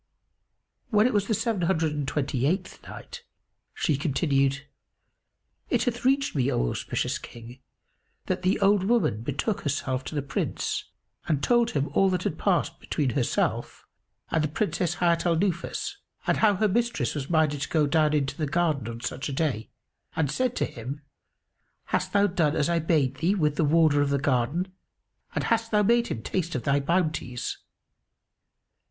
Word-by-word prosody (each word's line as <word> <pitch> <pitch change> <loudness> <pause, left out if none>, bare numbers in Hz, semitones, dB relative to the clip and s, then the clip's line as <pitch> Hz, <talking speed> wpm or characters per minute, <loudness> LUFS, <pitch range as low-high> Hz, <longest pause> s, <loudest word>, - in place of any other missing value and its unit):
When 215 -2 +4
it 250 - +2
was 205 -1 +1
the 220 - +1
Seven 220 -2 -1
Hundred 165 -3 +1
and 145 -2 -3
Twenty 135 -2 0
eighth 180 +3 -2
Night, 485 -1 -10 0.5
She 150 - +1
continued, 140 -2 +1 1.0
It - - +2
hath 245 -1 -2
reached 275 +2 +2
me, 135 -1 +2
O - - +1
auspicious - - -2
King, 120 +2 -11 0.7
that - - -1
the 185 +1 +1
old 200 -1 +4
woman 225 - +2
betook 145 - -2
herself 135 -3 -2
to - - -6
the 145 - -1
Prince 140 - -2 0.4
and 150 -3 0
told 240 -1 +3
him 140 +1 0
all 195 - +3
that 180 -1 -1
had 160 - -2
passed 190 -4 +1
between 140 -5 -1
herself 125 -3 -1 0.5
and 160 - +2
the - - +2
Princess 175 +1 -1
Hayat 170 0 +2
al 170 - +3
Nufus; 195 - -2 0.3
and - - +2
how 210 -2 +4
her 215 +3 +2
mistress 235 +3 0
was 140 -3 -4
minded 155 -4 +2
to - - -3
go 155 -2 +3
down 150 +1 +2
into 140 -1 0
the 155 -1 -2
garden 150 -5 0
on 115 0 -6
such 130 +3 -4
a - - -4
day 130 -7 -1 0.5
and 145 -4 0
said 250 - 0
to - - +1
him, 135 +5 -7 0.9
"Hast - - +1
thou 200 0 +4
done 170 -6 +1
as 150 - +1
I 170 -1 +2
bade 155 -5 +1
thee 175 +6 +1
with 150 -6 +1
the 165 - +1
Warder 155 -1 +4
of 145 - +1
the 140 - +2
garden 140 +7 0 0.6
and - - 0
hast 230 0 +1
thou 210 -1 +3
made 235 +3 +3
him 110 - -4
taste 170 -4 -2
of 125 - -2
thy 140 -1 +2
bounties?" 155 -5 -1
160 Hz, 175 wpm, -26 LUFS, 140-195 Hz, 1.0 s, When